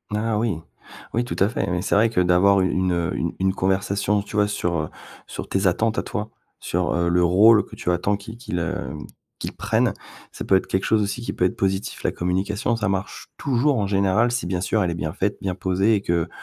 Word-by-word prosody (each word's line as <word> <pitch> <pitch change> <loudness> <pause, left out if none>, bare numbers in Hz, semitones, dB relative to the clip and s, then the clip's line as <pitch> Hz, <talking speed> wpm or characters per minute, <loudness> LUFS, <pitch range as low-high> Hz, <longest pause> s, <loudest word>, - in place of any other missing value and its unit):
Ah 110 0 0
oui! 110 -6 0 0.6
Oui, 120 +2 +1
tout - - -4
à 100 - +4
fait, 115 - -2
oui. 90 0 -1
C'est - - +1
vrai 110 +3 +4
que 100 -5 +1
d'avoir 90 +2 +4
u 95 - +2
une, 90 -1 +1
heu, 85 +1 -1
u 85 - -2
une 95 0 +2
conversation, 100 +2 0
tu 105 +1 -7
vois 105 0 +4
sur, 90 -4 -1
heu, 75 -1 -2 0.4
sur - - -7
tes 95 0 +1
attentes 110 +5 +1
à - - -2
toi, 105 +1 -4 0.3
sur, 90 +1 -1
heu, 85 0 +1
le 90 +1 +3
rôle 105 +5 +6
que 110 - -12
tu 90 - -1
attends, 90 +4 +1
qu'il 110 +3 -9
qu'il, 105 -7 -4
heu, 90 +1 -3 0.4
qu'il - - -5
prenne, - - +1 0.4
ça - - -7
peut 95 - +4
être 95 - +1
quelque 95 - -1
chose 110 -1 +3
aussi 105 +4 -2
qui 120 - -4
peut - - -1
être 90 - +1
positif. 95 0 -2
La - - 0
communication, 100 +6 -1
ça 105 -2 -1
marche 95 -1 -3
toujours 135 +1 +1
en 100 - 0
général 100 +4 +2
si 120 -5 -2
bien 90 -1 -1
sûr 105 +3 +1
elle 90 -3 0
est - - -3
bien 80 -2 -3
faite, 100 +5 -1
bien 95 -2 -2
posée 95 +4 +2
et 100 - 0
que 85 -3 0
95 Hz, 240 wpm, -23 LUFS, 90-105 Hz, 0.6 s, rôle